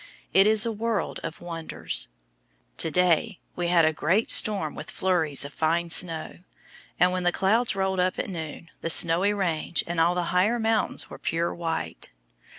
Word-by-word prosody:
It 195 +2 +5
is 215 +1 +4
a 230 - -1
world 225 0 -3
of 160 - -7
wonders. 165 - -1 0.7
To - - +2
day 180 +4 +1 0.2
we 175 -1 -2
had 170 -2 +4
a 160 - +2
great 180 +9 +1
storm 195 -8 +4
with 150 - -9
flurries 160 -7 0
of 145 - -9
fine 165 +2 -1
snow; 165 -2 +1 0.6
and 180 0 +4
when 185 0 -2
the 175 0 +1
clouds 210 +5 +1
rolled 190 -1 -1
up 180 0 0
at - - -3
noon, 165 -3 -8
the 165 - -3
Snowy 170 +4 +4
Range 175 -5 -1
and 170 -1 -3
all 170 +2 +2
the 180 -1 -2
higher 200 +7 +2
mountains 225 -1 -1
were - - -10
pure 170 +1 -2
white. 165 -1 -4
175 Hz, 175 wpm, -25 LUFS, 165-195 Hz, 0.7 s, It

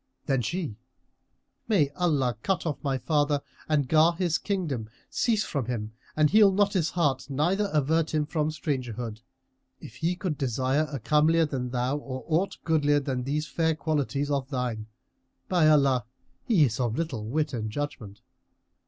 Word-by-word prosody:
Then 135 -3 +1
she, 145 - -3 0.9
"May 185 -11 +3
Allah 145 -6 +1
cut 185 +3 -1
off 155 -2 -3
my 135 -2 0
father 145 0 +1 0.3
and 145 -4 +2
gar 160 +3 +5
his 175 -2 0
kingdom 155 - -2 0.2
cease 220 -3 +1
from 135 -6 -3
him 110 -3 -3 0.2
and 155 -1 +3
heal 210 -2 +7
not 200 +1 +2
his 170 -5 +1
heart 145 -6 0
neither 180 +9 +1
avert 155 +2 +2
from 155 - +1
him 150 0 -1
strangerhood, 125 -7 -4 0.6
if 115 - -11
he 170 +5 0
could 180 -6 -3
desire 130 +4 +1
a 140 - -3
comelier 155 +7 +3
than 130 -4 -3
thou 125 +3 -1
or 130 -3 -6
aught 170 +5 0
goodlier 145 -3 +3
than 130 -3 -3
these 150 +3 -1
fair 160 +2 0
qualities 145 -2 -1
of 135 -2 -1
thine! 125 -5 -3 0.6
By 175 -4 +3
Allah, 135 -6 +4 0.4
he 200 -10 +4
is 110 -3 -2
of 120 -1 0
little 135 -10 -3
wit 150 +4 -1
and 110 -3 -3
judgment!" 105 -5 -5
145 Hz, 160 wpm, -27 LUFS, 130-160 Hz, 0.9 s, heal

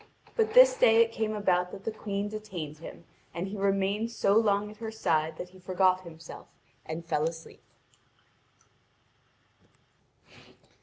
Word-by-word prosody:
But 440 -1 0
this - - +8
day 230 - +6
it 230 - -5
came 220 -1 -2
about 180 -3 +1
that 195 - -10
the 225 - -1
Queen 205 -1 -4
detained 190 -8 -7
him, 170 - -10 0.3
and 175 +3 -3
he 200 - -6
remained 200 +2 0
so 200 -3 +1
long 210 -1 +2
at 215 - -15
her 225 0 -5
side 160 -7 0
that 180 - -7
he 185 +1 -17
forgot 185 0 +2
himself 165 -2 -11 0.4
and 160 +1 -5
fell 150 -2 0
asleep. 165 0 -7
195 Hz, 145 wpm, -29 LUFS, 170-215 Hz, 0.4 s, this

